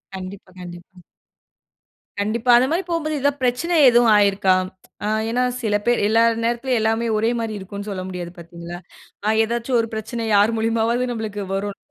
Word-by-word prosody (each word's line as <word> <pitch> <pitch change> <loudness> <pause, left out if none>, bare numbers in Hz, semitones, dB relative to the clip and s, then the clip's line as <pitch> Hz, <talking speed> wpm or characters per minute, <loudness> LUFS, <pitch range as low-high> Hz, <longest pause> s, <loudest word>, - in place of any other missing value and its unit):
கண்டிப்பா, 190 0 -9
கண்டிப்பா. 175 +1 -11 1.2
கண்டிப்பா. 225 +4 +1
அது 255 +2 +3
மாரி 345 +4 0
போம்போது 315 -2 -1
ஏதாவது 285 +1 0
பிரச்சன 320 +8 +1
எதுவும் 240 -2 +4
ஆயிருக்கா? 200 -2 +3 0.5
அ, - - -1 0.2
ஏனா 245 +2 0 0.2
சில 210 -2 +1
பேர் 240 0 +2
எல்லா 225 +2 +3 0.2
நேரத்திலும் 240 +2 0
எல்லாமே 225 +1 0
ஒரே 225 +2 +1
மாதிரி 225 -1 -3
இருக்கும்னு 200 +2 -7
சொல்ல 190 -2 -4
முடியாது 180 -2 -6
பாத்தீங்களா? 170 0 -9 0.5
அ, - - 0 0.2
ஏதாச்சு 235 +3 -3
ஒரு 225 - -5
பிரச்சனை, 225 +2 -4
யார் 210 +3 +4
மூலியமாவது 230 +2 0
நம்மளுக்கு 210 -3 -4
வரும் 200 +1 -3
220 Hz, 155 wpm, -21 LUFS, 200-240 Hz, 1.2 s, எதுவும்